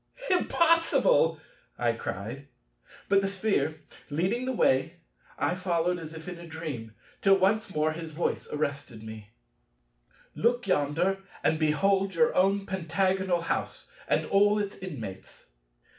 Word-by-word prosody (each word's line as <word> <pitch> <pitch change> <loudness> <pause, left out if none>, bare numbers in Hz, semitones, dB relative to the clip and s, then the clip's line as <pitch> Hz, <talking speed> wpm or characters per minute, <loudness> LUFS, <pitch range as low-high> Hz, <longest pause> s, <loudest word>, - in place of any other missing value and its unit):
"Impossible!" 325 - +3 0.4
I 120 -1 +2
cried; 115 +5 -6 0.6
but, 200 0 +4
the 195 - 0
Sphere 185 -6 -1 0.3
leading 185 - 0
the 260 - -1
way, 135 - +2 0.4
I - - +1
followed 180 -1 0
as 160 0 -8
if 160 +1 -9
in 180 -1 -6
a 170 - -10
dream, 145 -9 -6 0.3
till 195 -1 +6
once 195 +1 +1
more 155 +1 +2
his 160 0 -6
voice 155 +3 -2
arrested 140 -6 -3
me: 110 -1 -9 1.0
"Look 240 +1 +1
yonder, 175 +3 +1 0.2
and 160 - +2
behold 190 +5 +2
your 235 +7 +3
own 195 +2 +3
Pentagonal 190 0 0
house, 165 - -3 0.2
and - - +1
all 205 +1 +4
its 205 -1 -2
inmates." 115 - -9
175 Hz, 130 wpm, -28 LUFS, 150-195 Hz, 1.0 s, till